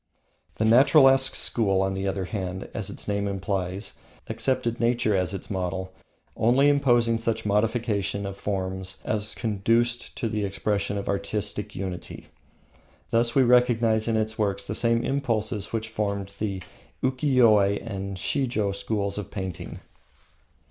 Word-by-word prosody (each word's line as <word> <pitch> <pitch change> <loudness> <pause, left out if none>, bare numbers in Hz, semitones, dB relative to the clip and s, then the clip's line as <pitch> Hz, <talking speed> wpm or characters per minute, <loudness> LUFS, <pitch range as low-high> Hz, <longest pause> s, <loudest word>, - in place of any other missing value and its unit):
The 110 - 0
Naturalesque 135 +2 +6
school, 95 -5 +2
on 95 0 -1
the 95 +1 -2
other 95 -1 -2
hand, 95 -1 -4
accepted 100 +4 -3
nature 120 -3 +2
as 90 -2 0
its 95 0 -6
model, 95 0 -3 0.4
only 130 +5 +4
imposing 120 -5 +3
such 115 -1 -1
modifications 105 -1 0
of 100 -1 -5
form 95 -2 -3 0.2
as 105 0 -1
conduced 115 +2 0
to 115 - -2
the 105 -1 -2
expression 100 +1 -1
of 100 - -4
artistic 105 +1 -3
unity. 95 -2 -6 0.8
Thus 115 0 +2
we 135 - +6
recognise 120 -3 +3
in 115 -1 +1
its 110 0 -2
works 100 -2 0
the - - -3
same 115 0 +1
impulses 115 -6 -1
which 110 -1 -3
formed 100 -3 -3
the 100 -4 -3 0.4
Ukiyoe 130 -4 +4 0.3
and 100 -3 -5
Shijo 120 -2 0
schools 100 0 -2
of 105 - -6
painting. 95 -4 -6
105 Hz, 130 wpm, -26 LUFS, 100-115 Hz, 0.8 s, Naturalesque